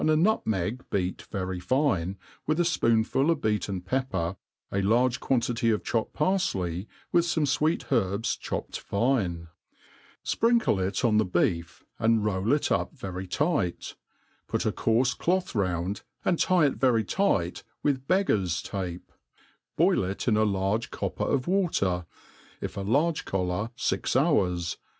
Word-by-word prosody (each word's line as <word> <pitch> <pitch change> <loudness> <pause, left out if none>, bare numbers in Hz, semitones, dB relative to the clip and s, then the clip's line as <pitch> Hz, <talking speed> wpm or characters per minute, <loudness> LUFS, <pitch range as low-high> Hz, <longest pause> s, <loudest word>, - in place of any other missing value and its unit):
a 155 0 +3
nutmeg 125 - +1
beat 95 -2 -2
very 95 -2 -3
fine, 100 - 0 0.3
with 155 +2 +1
a - - +5
fpoonful 130 -3 +2
of 165 -3 +2
beaten 105 -4 -1
pepper, 95 -4 -1 0.2
% - - -49
large 115 +6 +2
quantity 120 -2 +1
pf 110 -2 +1
chopped 115 -2 -1
parfley, 100 - 0 0.2
with 170 -1 +4
fome 170 -2 0
fweet 150 +3 0
herbs 100 +1 +1
chopped - - -5
fine; 100 -7 0 0.8
fprinkle 230 - +2
it 95 +6 -1
on 110 -2 +3
the 110 - +4
beef, 90 - -1 0.2
and 110 -1 +3
roll 100 +2 0
it 145 0 +1
up - - 0
very 95 -4 -5
tight, 100 - -1 0.5
put - - -1
a - - +2
coarfe 125 +3 +1
cloth 185 +1 0
round, 90 -2 -1 0.2
and 175 - +2
tie 180 -4 +4
it 140 - 0
very 120 -4 +3
tight 95 - 0 0.2
with 135 -2 0
beggars* 105 - +1
tape; 90 -3 -5 0.7
boi( - - +4
it 100 - -5
in 110 - +4
a 110 - +3
large 100 +2 0
copper - - -3
of 130 -2 0
water, 100 - +1 0.5
if - - -5
a 100 - -3
large 145 +11 +1
collar, 90 +3 -1
fix - - -1
hours 95 - +1
110 Hz, 145 wpm, -27 LUFS, 95-145 Hz, 0.8 s, a